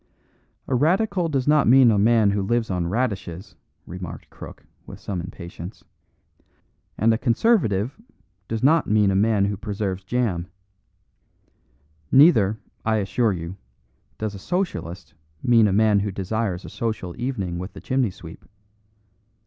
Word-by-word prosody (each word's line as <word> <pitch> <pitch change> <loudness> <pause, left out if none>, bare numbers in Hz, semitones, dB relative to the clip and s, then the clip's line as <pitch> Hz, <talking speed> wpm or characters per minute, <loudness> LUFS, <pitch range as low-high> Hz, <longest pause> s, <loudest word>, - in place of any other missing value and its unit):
"A - - -2
radical 180 - +1
does 135 -3 -1
not 150 0 +4
mean 125 0 +7
a 105 - +2
man 110 -1 +4
who 100 0 0
lives 115 +2 0
on 90 -2 -1
radishes," 95 -4 -3 0.3
remarked 90 -2 -8
Crook, - - -11 0.2
with - - -10
some 95 -4 -4
impatience; 85 +1 -9 1.1
"and 115 +2 +3
a 110 - -1
Conservative 125 - +1 0.5
does 115 +1 -3
not 155 +3 +4
mean 105 -2 +3
a - - 0
man 105 0 +3
who 100 0 -1
preserves 100 -2 -4
jam. 95 -5 -1 1.6
Neither, 115 - +5 0.3
I 110 0 +1
assure 110 +3 +1
you, 85 +1 -6 0.6
does 110 -1 -3
a 100 - -8
Socialist 170 - -4 0.3
mean 115 -3 +5
a - - +1
man 105 +1 +3
who 100 0 -2
desires 100 0 -3
a - - -8
social 110 -6 -4
evening 100 -9 -3
with 90 +3 -7
the - - -10
chimney 130 -3 0
sweep. 85 -3 -12
105 Hz, 140 wpm, -23 LUFS, 95-120 Hz, 1.6 s, mean